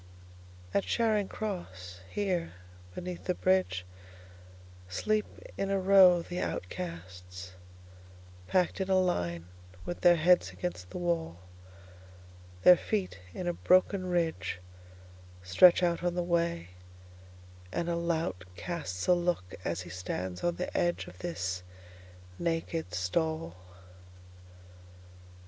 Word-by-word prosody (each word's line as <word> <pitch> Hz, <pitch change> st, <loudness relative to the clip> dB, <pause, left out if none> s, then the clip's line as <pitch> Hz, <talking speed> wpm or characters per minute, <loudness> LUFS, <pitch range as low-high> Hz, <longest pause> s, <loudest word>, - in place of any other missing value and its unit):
At 100 Hz, -, +2 dB
Charing 210 Hz, -, +1 dB
Cross, 95 Hz, -, -6 dB
here, 185 Hz, -, -1 dB, 0.4 s
beneath 180 Hz, -1 st, -6 dB
the 180 Hz, -, 0 dB
bridgeSleep 185 Hz, -, +1 dB, 1.8 s
in 195 Hz, -, 0 dB
a 195 Hz, 0 st, +1 dB
row 185 Hz, -2 st, +7 dB
the 180 Hz, +1 st, -5 dB
outcasts, 90 Hz, +1 st, -6 dB, 1.0 s
Packed 185 Hz, +1 st, +1 dB
in 190 Hz, -, -2 dB
a 190 Hz, -1 st, +5 dB
line 85 Hz, -, 0 dB, 0.4 s
with 175 Hz, -, -5 dB
their 175 Hz, -1 st, +7 dB
heads 175 Hz, -, +4 dB
against 90 Hz, 0 st, -5 dB
the -, -, -6 dB
wall. 170 Hz, -, -1 dB, 1.3 s
Their 180 Hz, -1 st, +9 dB
feet, 190 Hz, -, -2 dB, 0.2 s
in 180 Hz, -, -4 dB
a 175 Hz, -, +1 dB
broken 185 Hz, +2 st, +3 dB
ridgeStretch 90 Hz, -, +1 dB
out 170 Hz, -1 st, +2 dB
on 175 Hz, 0 st, 0 dB
the 175 Hz, -, 0 dB
way, 170 Hz, -, 0 dB, 1.0 s
and 170 Hz, -, -2 dB
a 170 Hz, -, 0 dB
lout 165 Hz, -, -1 dB
castsA 150 Hz, -, -1 dB
look 175 Hz, -, -1 dB
as 85 Hz, +1 st, -2 dB
he 90 Hz, -1 st, -9 dB
stands 90 Hz, 0 st, -4 dB
on 175 Hz, 0 st, +1 dB
the 180 Hz, -, -4 dB
edge 175 Hz, 0 st, +1 dB
of 90 Hz, -, -13 dB
this 90 Hz, +1 st, -3 dB, 0.8 s
naked 165 Hz, -, -2 dB
stall. 160 Hz, -, -1 dB
165 Hz, 110 wpm, -30 LUFS, -, 1.8 s, Their